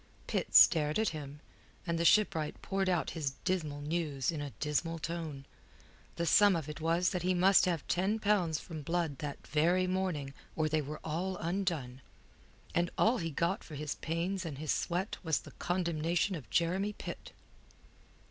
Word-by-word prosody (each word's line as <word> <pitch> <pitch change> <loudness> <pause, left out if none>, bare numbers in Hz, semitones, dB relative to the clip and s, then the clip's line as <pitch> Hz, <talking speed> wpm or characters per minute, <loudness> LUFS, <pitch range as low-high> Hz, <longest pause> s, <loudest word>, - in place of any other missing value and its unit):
Pitt - - -2
stared 150 -3 +7
at 220 -1 +2
him, 150 -2 -8 0.4
and 170 -1 -1
the 170 - +1
shipwright 165 -7 +3
poured 195 -1 0
out 175 -2 0
his 145 -5 -2
dismal 155 -6 -1
news 150 -3 -1
in 155 -3 -4
a 145 - -4
dismal 160 +3 -1
tone. 160 -4 -5 0.7
The 170 - -1
sum 200 +4 +6
of 160 -4 -3
it 150 0 -7
was 170 +3 +2
that 180 - -2
he 185 +1 +1
must 190 +2 +5
have 170 -5 -1
ten 190 +5 +1
pounds 200 -7 +1
from 160 -3 -7
Blood 165 -2 -1
that 145 -2 -6
very 170 +5 +2
morning 180 -7 -2 0.2
or 155 -1 +1
they 155 0 +1
were 150 +2 -6
all 175 +4 -2
undone. 165 -8 -2 0.7
And 175 0 +1
all 235 +3 +3
he 165 -2 -2
got 170 +7 -1
for 155 - -9
his 150 0 -3
pains 175 +4 -2
and 155 -5 -5
his 155 +1 -2
sweat 180 +3 -1
was 160 -4 0
the - - -12
condemnation 170 +1 0
of 150 -8 -7
Jeremy 185 +5 +1
Pitt. - - -8
165 Hz, 175 wpm, -32 LUFS, 150-185 Hz, 0.7 s, stared